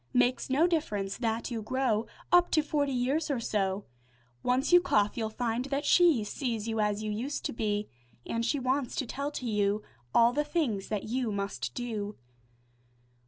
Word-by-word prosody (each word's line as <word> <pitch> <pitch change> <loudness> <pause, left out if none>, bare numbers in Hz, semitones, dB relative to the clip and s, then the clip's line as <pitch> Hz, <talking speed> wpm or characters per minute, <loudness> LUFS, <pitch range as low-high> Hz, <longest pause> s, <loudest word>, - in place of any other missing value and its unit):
Makes 250 +1 +2
no 280 +6 +4
difference 210 - -1
that 230 0 -1
you 230 -2 -2
grow 230 -1 0 0.2
Up 355 0 +6
to 310 - +4
forty 290 -2 0
years 270 +6 0
or 275 -4 0
so, 200 -3 -1 0.6
Once 255 +6 +1
you 355 - +9
cough, 210 - +2
you'll 220 -2 -2
find 235 +2 -2
that 280 +1 -2
she 330 -9 +5
Sees 230 0 -3
you 225 -1 -1
as 210 0 0
you 215 - -2
used 250 +7 -3
to - - -1
be, 210 -2 -1 0.4
An' 230 - -2
she 240 +5 +1
wants 260 0 -1
to 270 - -1
tell 280 +4 -3
to 275 -3 -6
you 210 -1 +1 0.3
All 235 - +5
the 295 +3 +1
things 295 - -1
that 210 -2 -2
you 245 0 -1
must 200 -12 -3
do. 215 -4 -4
235 Hz, 180 wpm, -30 LUFS, 210-275 Hz, 0.6 s, you